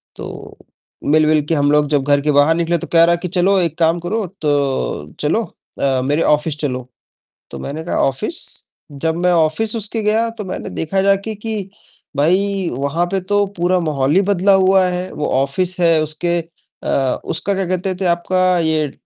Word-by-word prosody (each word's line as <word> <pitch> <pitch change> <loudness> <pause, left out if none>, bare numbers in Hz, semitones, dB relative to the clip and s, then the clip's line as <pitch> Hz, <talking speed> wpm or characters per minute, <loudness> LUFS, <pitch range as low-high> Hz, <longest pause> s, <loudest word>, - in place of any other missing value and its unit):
तो - - -9 0.6
मिल-विल 155 -1 +4
के 165 - +3
हम 145 0 +2
लोग 150 0 +3
जब 145 -3 +1
घर 145 0 +2
के 150 - +1
बाहर 145 +3 +4
निकले 170 0 0
तो - - -7
कह 165 0 +7
रहा 170 0 +4
कि - - 0
"चलो 185 +2 +2
एक 165 -3 -2
काम 165 +1 +2
करो 200 +5 -2 0.2
तो 135 - -1
चलो 160 +10 +1 0.4
अ, 135 -2 +2
मेरे 145 +4 +1
ऑफिस 150 0 +1
चलो।" 130 -4 -3 0.6
तो - - -7
मैंने 155 +3 -5
कहा 175 - -2
"ऑफिस?" 210 - -3 0.5
जब 160 +3 -2
मैं 180 - +4
ऑफिस 175 +7 +1
उसके 220 +1 -2
गया, 220 +2 +2
तो 225 -2 -7
मैंने 185 - -5
देखा 190 +4 -1
जाके 200 +2 +1
कि 210 -2 -5 0.5
भाई 190 +4 +1
वहाँ 140 +7 -1
पे 195 - +1
तो 205 +2 +1
पूरा 180 +1 +2
माहौल 145 -4 0
ही 195 - +5
बदला 200 0 +2
हुआ 190 0 +4
है। 180 +1 -3
वो 150 - -2
ऑफिस 180 +6 -1
है 165 -2 +4
उसके 170 +3 -1 0.4
अ, 135 -2 0
उसका 165 +5 0
क्या 195 -1 -1
कहते 185 +1 -1
थे - - 0
आपका 185 +1 +1
ये 160 -2 +1
अ, - - -10
170 Hz, 190 wpm, -18 LUFS, 150-190 Hz, 0.6 s, कह